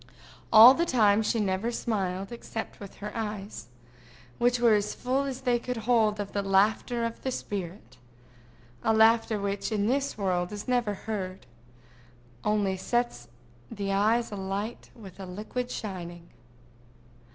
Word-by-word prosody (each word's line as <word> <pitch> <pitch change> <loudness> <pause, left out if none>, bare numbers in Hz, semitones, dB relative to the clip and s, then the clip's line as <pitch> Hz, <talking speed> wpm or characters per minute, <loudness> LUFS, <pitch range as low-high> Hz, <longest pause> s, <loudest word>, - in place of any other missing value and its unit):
All 225 +4 +10
the 335 - 0
time 215 -5 +4
she 225 +1 0
never 200 +3 0
smiled, 195 -4 -2
except 230 -1 -6
with 200 -2 -10
her 210 +1 -7
eyes, 210 - -5 0.7
which 245 0 +2
were 235 -2 +5
as 210 0 0
full 260 +3 -1
as 265 -1 -5
they 245 -2 +1
could 250 0 -4
hold 220 -2 +2
of 200 -1 -4
the 200 - -1
laughter 210 +4 +2
of 230 0 -5
the 265 - -2
spirit—a 125 - -6
laughter 225 -1 +4
which 200 +2 -2
in 205 -2 0
this 275 +3 0
world 180 -3 -1
is 205 +2 -7
never 240 -5 +1
heard, 190 -3 -5 1.0
only 205 -3 +1
sets 240 - -2 0.4
the 200 -3 -3
eyes 220 +4 +2
alight 200 +3 -4
with 200 -5 -13
a 190 - -7
liquid 215 +7 -5
shining. 175 -7 -7
210 Hz, 140 wpm, -28 LUFS, 190-235 Hz, 1.0 s, All